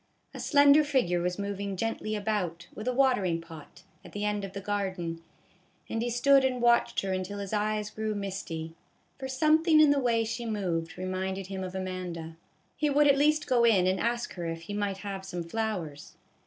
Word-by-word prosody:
A - - -8
slender 285 +1 +6
figure 215 -12 +1
was 180 +1 -1
moving 200 -1 -4
gently 220 0 -2
about, 200 -5 -2
with 215 - -7
a - - +3
watering 245 -10 +2
pot, 165 +1 -12 0.2
at - - -13
the 205 0 -2
end 210 -1 -1
of 195 -1 -6
the 200 - -4
garden, 190 -4 -3 0.7
and 225 - -2
he 240 - -1
stood 270 +3 +4
and 255 -1 0
watched 240 0 +3
her 195 -1 -2
until 185 +2 -3
his 200 0 -5
eyes 210 0 -1
grew 215 0 -3
misty; 185 -5 -5 0.5
for 265 - -4
something 310 +4 +4
in 305 -2 +7
the 285 - +3
way 235 -3 +2
she 230 +2 -4
moved 180 -7 -2
reminded 185 +1 -3
him 190 0 -5
of 185 0 -6
Amanda. 180 -3 -5 0.4
He 300 - 0
would 290 +1 +4
at 280 - +6
least 305 +2 +3
go 245 -2 +3
in 210 -6 +5
and 185 +1 +1
ask 235 +1 -1
her 175 -2 -5
if 165 0 -4
he 185 +5 -7
might 205 -1 -1
have 195 -1 -6
some 180 -3 -5
flowers. 175 -6 -4
205 Hz, 195 wpm, -29 LUFS, 185-240 Hz, 0.7 s, in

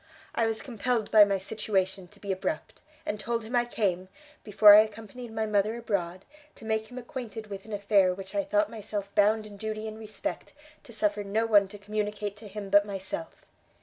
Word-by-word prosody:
I 230 - +2
was 225 0 -3
compelled 240 -2 -1
by 215 -1 +9
my 200 -1 0
situation 190 -2 -2
to 205 +3 -20
be 200 -1 -4
abrupt, 190 +11 -3 0.2
and 210 - -3
told 235 +1 -2
him 230 +3 -4
I 240 0 +3
came, 190 -6 -1 0.4
before 210 0 +8
I 210 - +10
accompanied 220 +2 -3
my 220 0 -1
mother 210 +1 +1
abroad, 190 -6 -3 0.3
to 225 - -13
make 220 0 -1
him 250 - -10
acquainted 235 -3 -7
with 195 0 -7
an 220 - -11
affair 200 -2 +3
which 190 +1 -7
I 300 - +1
thought 310 +2 +1
myself 205 -2 -5
bound 215 +1 +3
in 205 -1 -11
duty 215 +1 -4
and 215 0 -7
respect 215 +7 -5 0.3
to - - -13
suffer 210 -2 0
no 210 +3 0
one 205 -3 +5
to 205 +2 -10
communicate 210 0 -3
to 210 0 -10
him 200 -1 -7
but 205 0 +7
myself. 190 -4 -6
210 Hz, 200 wpm, -28 LUFS, 200-225 Hz, 0.4 s, I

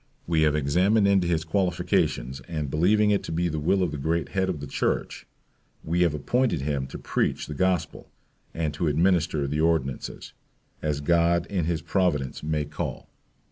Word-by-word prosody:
We 80 -2 +1
have 75 -1 +3
examined 90 +9 +3
into 95 -3 +3
his 80 -2 +1
qualifications, 80 -7 0
and 75 -5 -3
believing 105 +7 +3
it 100 - +2
to - - -5
be 85 +2 0
the 80 -1 -3
will 95 +6 +2
of 85 - -1
the 75 - -5
great 80 +3 -1
Head 95 -1 0
of 85 -5 -2
the 70 - -6
church, 70 - -2 0.6
we 85 +3 0
have 85 -4 +3
appointed 120 - 0
him 70 -2 -2
to - - -8
preach - - -1
the 75 - -6
Gospel, 90 +2 -1 0.4
and 80 -2 -2
to 80 +3 -1
administer 80 -1 +2
the 75 +3 -1
ordinances, 80 -5 -1 0.5
as 75 -2 -1
God 85 +2 +2
in 90 -5 0
his 80 -1 -2
providence 75 -10 0
may 75 -1 -1
call. 75 +1 -5
80 Hz, 180 wpm, -26 LUFS, 75-90 Hz, 0.6 s, have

